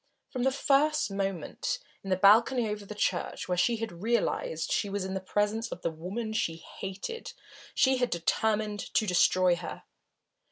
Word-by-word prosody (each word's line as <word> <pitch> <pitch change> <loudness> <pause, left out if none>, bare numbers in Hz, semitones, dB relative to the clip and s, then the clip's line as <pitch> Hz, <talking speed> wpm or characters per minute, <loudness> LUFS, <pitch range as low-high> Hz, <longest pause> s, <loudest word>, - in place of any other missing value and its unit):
From 255 - -3
the 265 +2 +3
first 280 -1 +2
moment 195 -4 -2 0.2
when, - - -21
in - - -3
the 185 - +3
balcony 230 +4 +5
over 210 -1 -5
the 210 - -7
church, 185 -3 -1
she 230 +6 +3
had 215 -7 -6
realised 210 -7 0
that - - +1
she 205 - 0
was 200 -1 -2
in 190 - -4
the 190 - -1
presence 210 +4 0
of - - -7
the 170 - 0
woman 195 +8 -5
she 165 -7 0
hated, 195 - -7 0.4
she 265 -1 +4
had 245 -1 +1
determined 210 +4 0 0.2
to 220 - +4
destroy 180 -1 +4
her. 170 - -7
205 Hz, 175 wpm, -29 LUFS, 185-230 Hz, 0.4 s, balcony